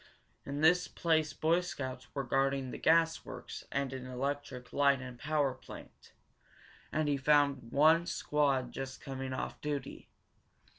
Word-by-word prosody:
In 140 Hz, +1 st, -3 dB
this 180 Hz, +2 st, +5 dB
place 160 Hz, -2 st, +1 dB
Boy 165 Hz, +3 st, +2 dB
Scouts 130 Hz, -7 st, -6 dB
were 140 Hz, -, -1 dB
guarding 135 Hz, 0 st, 0 dB
the -, -, -6 dB
gas 165 Hz, 0 st, +3 dB
works -, -, -8 dB
and 140 Hz, -1 st, -1 dB
an 130 Hz, -1 st, -6 dB
electric 130 Hz, 0 st, -4 dB
light 140 Hz, -1 st, +4 dB
and 125 Hz, -1 st, -8 dB
power 145 Hz, 0 st, +1 dB
plant, -, -, -13 dB, 0.8 s
and 155 Hz, -1 st, 0 dB
he 145 Hz, -1 st, +2 dB
found 140 Hz, -3 st, +2 dB
one 160 Hz, +4 st, +5 dB
squad 135 Hz, -4 st, +1 dB
just 135 Hz, 0 st, -6 dB
coming 135 Hz, -1 st, -5 dB
off 130 Hz, -, -4 dB
duty. 145 Hz, -3 st, -4 dB
140 Hz, 145 wpm, -32 LUFS, 130-155 Hz, 0.8 s, this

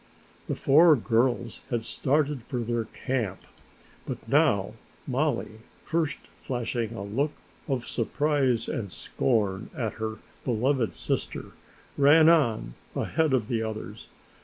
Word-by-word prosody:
The -, -, -1 dB
four 155 Hz, +3 st, +6 dB
girls 120 Hz, -1 st, 0 dB
had 120 Hz, -2 st, -1 dB
started 145 Hz, +3 st, 0 dB
for 125 Hz, -2 st, -3 dB
their 115 Hz, 0 st, -1 dB
camp, 110 Hz, -10 st, -3 dB, 0.7 s
but -, -, -6 dB
now -, -, +3 dB, 0.3 s
Mollie, 130 Hz, -5 st, -1 dB, 0.2 s
first 160 Hz, -2 st, 0 dB, 0.2 s
flashing 120 Hz, -2 st, -3 dB
a 100 Hz, -, -5 dB
look 135 Hz, +9 st, -1 dB, 0.3 s
of 130 Hz, -4 st, -1 dB
surprise 130 Hz, -1 st, +1 dB
and 100 Hz, -5 st, -3 dB
scorn 105 Hz, -4 st, -1 dB
at 115 Hz, -5 st, -1 dB
her 110 Hz, -, +1 dB
usually -, -, -14 dB, 0.2 s
beloved 125 Hz, 0 st, +1 dB
sister, -, -, -3 dB, 0.5 s
ran 155 Hz, +3 st, +7 dB
on 115 Hz, -, +2 dB, 0.2 s
ahead 160 Hz, -2 st, +1 dB
of 125 Hz, -5 st, +1 dB
the 115 Hz, -2 st, 0 dB
others. 110 Hz, -1 st, -6 dB
120 Hz, 125 wpm, -27 LUFS, 110-145 Hz, 0.7 s, ran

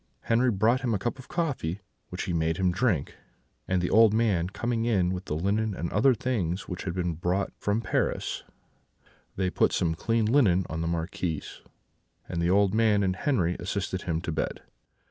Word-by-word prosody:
Henri 120 Hz, +3 st, +2 dB
brought 115 Hz, +4 st, +2 dB
him 120 Hz, -4 st, 0 dB
a -, -, +1 dB
cup 120 Hz, +6 st, -3 dB
of 130 Hz, -, -11 dB
coffee, 140 Hz, -, -2 dB, 0.3 s
which 90 Hz, -, -4 dB
he 90 Hz, -, -3 dB
made 80 Hz, 0 st, 0 dB
him 95 Hz, -2 st, +2 dB
drink; 90 Hz, -, 0 dB, 0.5 s
and 90 Hz, -1 st, +1 dB
the 90 Hz, -, 0 dB
old 110 Hz, -1 st, +6 dB
man 100 Hz, -7 st, +1 dB
coming 115 Hz, +3 st, -2 dB
in 95 Hz, -6 st, +2 dB
with 90 Hz, +1 st, -5 dB
the 75 Hz, -, -3 dB
linen 100 Hz, +5 st, 0 dB
and 85 Hz, -, -4 dB
other 125 Hz, +5 st, +4 dB
things 100 Hz, -7 st, -2 dB
which 90 Hz, -, -6 dB
had 90 Hz, -2 st, -3 dB
been 90 Hz, -2 st, -1 dB
brought 90 Hz, +4 st, -1 dB
from 105 Hz, +2 st, 0 dB
Paris, -, -, -1 dB, 0.9 s
they 95 Hz, -1 st, 0 dB
put -, -, +2 dB
some 85 Hz, -2 st, +1 dB
clean 115 Hz, +6 st, 0 dB
linen 105 Hz, -7 st, +3 dB
on 80 Hz, +1 st, -3 dB
the 80 Hz, -, -1 dB
Marquis, 85 Hz, -1 st, -2 dB, 0.8 s
and 85 Hz, -, -3 dB
the 85 Hz, -, +1 dB
old 100 Hz, +1 st, +3 dB
man 110 Hz, -2 st, +3 dB
and 95 Hz, -1 st, +1 dB
Henri 95 Hz, -, +1 dB
assisted 95 Hz, 0 st, -3 dB
him 80 Hz, -2 st, -2 dB
to 85 Hz, -, -3 dB
bed. 80 Hz, -, -3 dB
95 Hz, 190 wpm, -27 LUFS, 85-115 Hz, 0.9 s, old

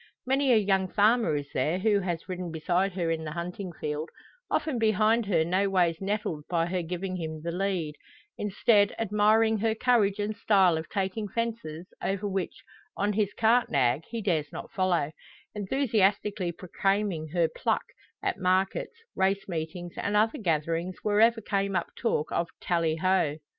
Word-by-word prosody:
Many 265 Hz, +1 st, +2 dB
a 235 Hz, -, +6 dB
young 195 Hz, -2 st, +2 dB
farmer 215 Hz, -2 st, +3 dB
is 145 Hz, -1 st, -4 dB
there 155 Hz, +7 st, +1 dB
who 205 Hz, +1 st, +2 dB
has 175 Hz, -3 st, -3 dB
ridden 180 Hz, -2 st, -4 dB
beside 175 Hz, +4 st, 0 dB
her 170 Hz, -3 st, -1 dB
in 160 Hz, -1 st, -2 dB
the 155 Hz, -1 st, -5 dB
hunting 180 Hz, +2 st, -5 dB
field, 150 Hz, -1 st, -4 dB, 0.4 s
often 285 Hz, -7 st, 0 dB
behind 220 Hz, +1 st, +3 dB
her 165 Hz, -5 st, +2 dB
no 190 Hz, +4 st, +1 dB
ways 175 Hz, -3 st, +2 dB
nettled 195 Hz, -6 st, -2 dB
by 165 Hz, -1 st, +1 dB
her 180 Hz, +1 st, -1 dB
giving 180 Hz, +2 st, -4 dB
him 160 Hz, -2 st, -5 dB
the 170 Hz, -, -2 dB
"lead;" 180 Hz, -4 st, -2 dB, 0.4 s
instead, 205 Hz, 0 st, +2 dB
admiring 220 Hz, +1 st, +3 dB
her 220 Hz, +1 st, +1 dB
courage 220 Hz, -5 st, +2 dB
and 210 Hz, +1 st, -2 dB
style 195 Hz, -5 st, +4 dB
of 160 Hz, 0 st, -5 dB
taking 200 Hz, +1 st, -2 dB
fences 220 Hz, -7 st, -4 dB, 0.2 s
over 195 Hz, +1 st, -1 dB
which, 190 Hz, -2 st, -3 dB, 0.3 s
on 205 Hz, +1 st, +1 dB
his 205 Hz, -1 st, +1 dB
cart 230 Hz, +2 st, +3 dB
nag, 130 Hz, +2 st, +2 dB
he 230 Hz, -1 st, -4 dB
dares 160 Hz, -7 st, 0 dB
not -, -, -8 dB
follow 175 Hz, -6 st, +1 dB, 0.4 s
enthusiastically 205 Hz, -4 st, +1 dB
proclaiming 195 Hz, -1 st, -1 dB
her 170 Hz, +1 st, +1 dB
"pluck" -, -, -1 dB, 0.4 s
at 390 Hz, -2 st, -1 dB
markets, 190 Hz, -, 0 dB, 0.2 s
race 195 Hz, +1 st, +1 dB
meetings, 175 Hz, 0 st, -5 dB
and 205 Hz, -, -1 dB
other 220 Hz, +1 st, +2 dB
gatherings 165 Hz, -1 st, -1 dB
wherever 225 Hz, +2 st, +4 dB
came 200 Hz, -1 st, -1 dB
up 175 Hz, -, -1 dB
talk 190 Hz, -10 st, -1 dB
of 170 Hz, -, 0 dB
"Tally 165 Hz, -2 st, 0 dB
ho." 165 Hz, -3 st, +1 dB
190 Hz, 165 wpm, -28 LUFS, 170-210 Hz, 0.4 s, a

